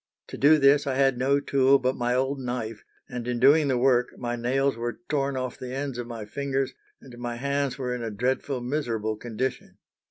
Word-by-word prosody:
To - - -6
do 150 +3 +6
this 140 0 +4
I 135 - 0
had 135 -2 +2
no 140 +2 +3
tool 135 -1 +4
but 130 0 0
my 120 0 0
old 135 +2 0
knife, 120 -4 -4 0.2
and 125 -2 -6
in 120 -1 -1
doing 145 +4 +5
the 130 -2 +1
work 125 -1 +2
my 120 0 -3
nails 135 +3 +1
were 120 +6 -4
torn 140 -2 0
off 130 -1 -4
the 130 0 -6
ends 135 -3 -3
of 120 - -4
my 115 -3 -6
fingers, 135 +3 -2 0.3
and 125 -3 -12
my 120 -1 -4
hands 140 +1 -1
were 125 -2 -2
in 125 - -4
a 115 - -3
dreadful, 125 +4 -1
miserable 120 -5 -2
condition. 120 +3 -4
130 Hz, 210 wpm, -26 LUFS, 120-140 Hz, 0.3 s, do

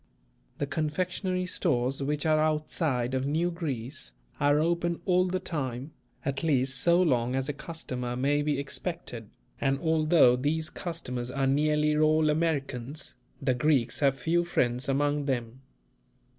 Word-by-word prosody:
The 145 - -1
confectionery 180 +5 -1
stores 135 -8 0
which 150 +3 -1
are 155 -1 +4
outside 150 -5 0
of 130 +1 0
New 165 +4 +1
Greece, 135 - -5 0.3
are 145 +1 +4
open 170 +2 0
all 180 -1 +3
the 185 +1 -1
time, 135 -4 -4 0.3
at 140 -2 -1
least 135 -5 +1
so 170 +4 +4
long 125 -8 +2
as 135 0 -1
a 145 - -2
customer 135 -5 -5
may 140 +3 +1
be 145 -1 0
expected, 140 - -4 0.3
and 135 0 +1
although 155 -4 +4
these 155 +5 -1
customers 125 -9 -4
are 135 +1 -1
nearly 150 +2 +2
all 155 0 +4
Americans, 145 -4 -2 0.3
the 130 - +1
Greeks 130 -1 +1
have 135 -2 +3
few 170 +4 +1
friends 125 -6 0
among 145 +1 +1
them. 125 -2 -3
145 Hz, 145 wpm, -28 LUFS, 130-160 Hz, 0.3 s, are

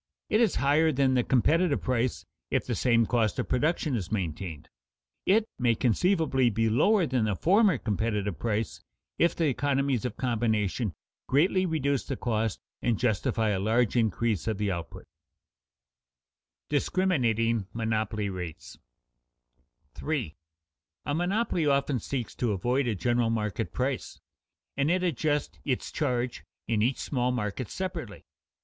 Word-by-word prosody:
It 215 - +4
is 225 -5 +3
higher 150 +4 +3
than 135 -2 +2
the 125 -1 +3
competitive 155 +6 +2
price 125 -1 -1 0.2
if - - 0
the - - -2
same 115 -2 +3
cost 110 -4 +1
of - - -2
production 150 +1 +1
is 95 -6 -4
maintained. 85 -5 -4 0.6
It 210 +3 +4
may 120 -2 +3
conceivably 135 - +2
be 115 +1 +1
lower 185 - +4
than 125 -5 0
the 105 -2 0
former 190 - +4
competitive 105 -3 -2
price 110 -1 -2 0.4
if 170 - +3
the 165 - +1
economies 140 -2 +1
of 125 - -4
combination 110 -4 0 0.3
greatly 185 +7 +3
reduce 140 -5 0
the 135 - -4
cost 110 -3 -1 0.2
and 120 -3 +1
justify 110 -1 +1
a 100 -2 0
large 110 +4 +1
increase 115 -2 +1
of 110 -3 0
the 105 -1 0
output. 85 -3 -6 1.6
[Sidenote: - - -64
Discriminating 115 - +1
monopoly 110 -2 -1
rates] 90 -2 -7 1.1
3. 135 - -3 0.7
_A 145 - -1
monopoly 175 -1 0
often 140 -2 +2
seeks 125 +2 -4
to 120 -4 0
avoid 125 +7 0
a 115 - 0
general 120 +5 +1
market 105 -4 -2
price, - - -3 0.6
and 140 - +1
it 180 +1 +2
adjusts 150 -3 -1
its 130 -3 -2
charge 125 -4 -1 0.2
in 110 -2 +1
each 125 +4 +1
small 125 -3 -1
market 115 -1 -3
separately. 170 - -5
120 Hz, 140 wpm, -28 LUFS, 110-145 Hz, 1.6 s, It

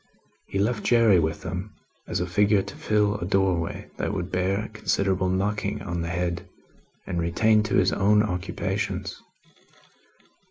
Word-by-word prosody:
He - - -4
left 105 +3 0
Jerry 115 -6 +5
with 80 0 -1
them, 90 +4 -5 0.3
as - - -2
a 90 - 0
figure 100 +2 +3
to - - -9
fill 105 -1 +1
a - - -3
doorway 95 -4 0
that - - -1
would 90 -2 -4
bear 95 +4 0
considerable 95 -3 0
knocking 100 +1 -1
on 90 -3 -3
the 85 - -3
head, 85 0 -2 0.6
and 85 - -2
returned 105 +6 +3
to 110 - -1
his 95 -1 +3
own 105 +1 +4
occupations. 90 -4 -3
95 Hz, 150 wpm, -25 LUFS, 90-105 Hz, 0.6 s, Jerry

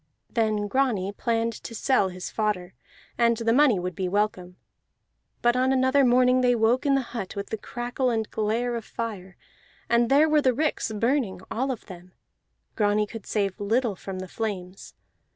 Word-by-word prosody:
Then 215 -2 0
Grani 215 -6 0
planned 230 +2 -1
to 230 - -7
sell 220 -4 +2
his 185 0 -7
fodder, 210 -5 -2 0.5
and 235 -1 +3
the 230 0 +1
money 265 -5 +5
would 180 0 -3
be 185 +2 -2
welcome. 185 -3 -1 0.9
But 240 0 +4
on 255 +1 +2
another 265 +1 +3
morning 250 0 +4
they 245 -1 +3
woke 235 +4 +2
in 275 - +4
the 270 - +1
hut 220 -4 -5
with 200 0 -5
the 220 - -1
crackle 245 +3 -2
and 220 -2 -1
glare 230 +3 -1
of 230 - -4
fire, 205 -6 -6 0.5
and 235 0 +3
there 290 +3 +5
were 305 -1 +3
the 255 -3 +2
ricks 300 -5 -1
burning, 220 -4 0
all 260 +4 -1
of 255 -4 -4
them; 180 -1 -12 0.6
Grani 210 0 +2
could 215 -1 -10
save 200 -2 -1
little 220 +1 0
from 190 +1 -7
the 185 0 -6
flames. 195 -3 -5
225 Hz, 175 wpm, -26 LUFS, 200-250 Hz, 0.9 s, money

